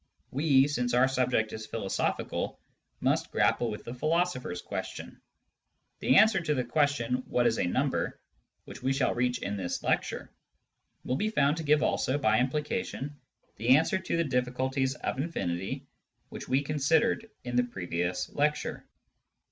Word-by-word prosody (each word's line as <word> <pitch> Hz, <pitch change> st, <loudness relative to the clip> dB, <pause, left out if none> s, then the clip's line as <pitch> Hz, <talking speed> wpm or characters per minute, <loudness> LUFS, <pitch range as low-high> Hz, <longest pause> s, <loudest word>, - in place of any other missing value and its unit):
We, 140 Hz, -1 st, +4 dB
since 125 Hz, -4 st, 0 dB
our 125 Hz, +2 st, +5 dB
object 125 Hz, -3 st, +1 dB
is 110 Hz, 0 st, -6 dB
philosophical, 110 Hz, -4 st, -2 dB, 0.4 s
must -, -, +1 dB
grapple 120 Hz, -, +2 dB
with 105 Hz, -, -6 dB
the 120 Hz, -, -6 dB
philosopher's 155 Hz, -, 0 dB
question. -, -, -6 dB, 0.8 s
The 130 Hz, -, +3 dB
answer 220 Hz, +4 st, +6 dB
to 150 Hz, -3 st, 0 dB
the 125 Hz, -, 0 dB
question, 125 Hz, -2 st, +1 dB
" -, -, -24 dB
What 120 Hz, -, +1 dB
is 115 Hz, -1 st, +2 dB
a -, -, +1 dB
number? -, -, -1 dB, 0.2 s
" -, -, -50 dB
which -, -, -10 dB
we 135 Hz, -, +1 dB
shall 135 Hz, 0 st, +1 dB
reach 125 Hz, 0 st, +1 dB
in 100 Hz, +1 st, -2 dB
this 90 Hz, -3 st, -3 dB
lecture, -, -, -1 dB, 0.7 s
will 130 Hz, -, 0 dB
be 215 Hz, -, 0 dB
found 145 Hz, -7 st, +2 dB
to 165 Hz, -, -3 dB
give 150 Hz, 0 st, +3 dB
also, 135 Hz, -2 st, +1 dB
by 110 Hz, -6 st, +3 dB
implication, 145 Hz, -, -2 dB, 0.4 s
the 120 Hz, +5 st, +5 dB
answer 165 Hz, +4 st, +1 dB
to 185 Hz, -, -2 dB
the 170 Hz, -, +3 dB
difficulties 130 Hz, 0 st, 0 dB
of 130 Hz, -, -3 dB
infinity 95 Hz, -, -3 dB, 0.4 s
which -, -, -8 dB
we 135 Hz, +2 st, +2 dB
considered 160 Hz, +11 st, +1 dB
in 125 Hz, 0 st, -4 dB
the 125 Hz, -, +4 dB
previous 90 Hz, -6 st, -2 dB
lecture. 150 Hz, +1 st, -1 dB
130 Hz, 160 wpm, -29 LUFS, 120-150 Hz, 0.8 s, answer